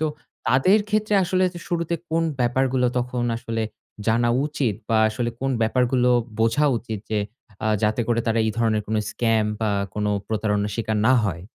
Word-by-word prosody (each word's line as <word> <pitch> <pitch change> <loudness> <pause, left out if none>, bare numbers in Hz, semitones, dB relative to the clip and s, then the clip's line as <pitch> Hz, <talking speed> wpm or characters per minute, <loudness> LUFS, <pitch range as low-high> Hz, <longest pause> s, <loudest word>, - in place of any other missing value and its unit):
তো 155 - +1 0.4
তাদের 160 +11 +4
ক্ষেত্রে 210 0 +1
আসলে 185 +1 +1
যে 175 - -8
শুরুতে 170 -2 -1 0.2
কোন 165 +1 +2 0.2
ব্যাপারগুলো, 125 +1 +2
তখন 125 0 -2
আসলে 115 -1 -3 0.4
জানা 120 +1 +3 0.2
উচিত, 145 -8 -1
বা 115 - +2
আসলে 120 +2 -2
কোন 135 0 0
ব্যাপারগুলো 125 +2 +2 0.3
বোঝা 115 +6 +3
উচিত? 110 -2 -6
যে 110 - +1 0.5
আ - - +2
যাতে 110 +2 +1
করে 115 -1 +2
তারা 115 0 +1
এই 110 - +1
ধরনের 110 -2 +1
কোন 110 - -1
স্ক্যাম 115 -2 +1 0.2
বা 110 - +1 0.2
কোন 105 - -2 0.2
প্রতারণার 105 -1 0
স্বীকার 110 -2 -1
না 130 - +6
হয়? 85 -3 -2
120 Hz, 170 wpm, -23 LUFS, 110-135 Hz, 0.5 s, না